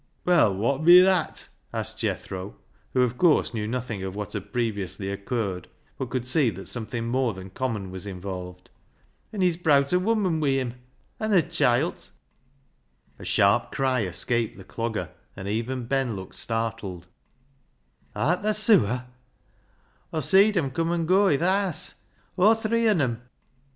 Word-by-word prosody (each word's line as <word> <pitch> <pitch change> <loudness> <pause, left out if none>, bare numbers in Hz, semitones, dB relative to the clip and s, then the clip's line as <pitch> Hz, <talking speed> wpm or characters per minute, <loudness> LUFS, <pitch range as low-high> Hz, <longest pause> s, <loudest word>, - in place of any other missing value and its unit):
"Well, 170 - +4
wot 135 +9 0
bi 175 +2 +9
that?" 185 -3 +1 0.2
asked - - -3
Jethro, 95 +1 -4 0.4
who, 125 - +4
of 125 0 -2
course, 165 -7 +3
knew 105 -2 -3
nothing 115 -3 -4
of 95 0 -5
what 105 -1 -5
had 100 -3 -6
previously 100 -5 -2
occurred, 100 -2 -3 0.3
but 130 - -3
could 125 -1 -3
see 130 -1 +3
that 95 -3 -8
something 115 0 -4
more 120 -2 0
than 95 0 -10
common 105 -5 -3
was 95 +2 -6
involved. 90 -1 -7 0.3
" - - -39
An' 205 - -4
he's 180 -3 +2
browt 145 -3 +3
a 180 - +4
woman 190 -5 +1
wi' 145 -3 +1
him 125 -3 -3 0.2
— - - -40
an' 215 -1 -1
a 180 -4 +5
chilt." 150 -2 +1 1.1
A - - -9
sharp - - +3
cry 130 -2 +1
escaped 110 +4 -1
the 95 - -11
Clogger, 115 +3 -4 0.2
and 95 0 -7
even 120 +4 -2
Ben 130 -2 0
looked 95 -1 -8
startled. 115 -6 -4 1.1
"Art 175 +8 +1
thaa 215 +1 +1
sewer?" 155 - +4 1.1
"Aw 160 - -2
seed 200 +5 +4
em' 140 -6 0
cum, 165 +5 -1
an' 170 -1 0
goa 190 +1 +4
i' - - +2
th' - - -7
haase; 190 -1 0 0.4
aw 210 +5 +6
three 230 +1 0
on 190 -7 +3
'em." 120 -3 -1
125 Hz, 165 wpm, -25 LUFS, 105-170 Hz, 1.1 s, bi